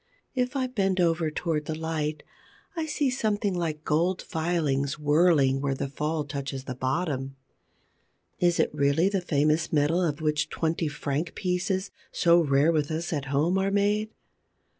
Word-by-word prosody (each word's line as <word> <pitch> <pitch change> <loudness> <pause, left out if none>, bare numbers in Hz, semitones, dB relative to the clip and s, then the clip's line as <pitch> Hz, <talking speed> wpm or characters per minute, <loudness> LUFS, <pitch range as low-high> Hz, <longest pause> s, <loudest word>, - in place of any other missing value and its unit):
If 250 +1 -1
I 265 -2 +1
bend 195 -7 0
over 165 -2 +2
towards 155 -1 -2
the 155 - -3
light, 155 -2 -3 0.5
I 325 -2 -2
see 290 -3 0
something 210 -5 0
like 160 -4 -3
gold 170 +5 +1
filings 150 -4 -1
whirling 150 -3 +3
where 140 -1 0
the 135 - -3
fall 150 +2 -2
touches 140 -2 -5
the 130 - -5
bottom. 135 0 -2 1.0
Is 175 -1 +2
it - - +2
really 145 +5 +2
the 195 -2 -1
famous 155 -1 +1
metal 155 +4 +2
of 155 -4 -1
which 150 -1 0
twenty 165 0 -1
franc 150 +2 -3
pieces, 185 +1 -1 0.2
so 170 0 +4
rare 145 0 +3
with 150 -3 0
us 165 +2 -3
at 145 -3 -2
home, 150 +7 +1
are 195 +1 +1
made? 205 +2 +1
160 Hz, 160 wpm, -27 LUFS, 145-180 Hz, 1.0 s, so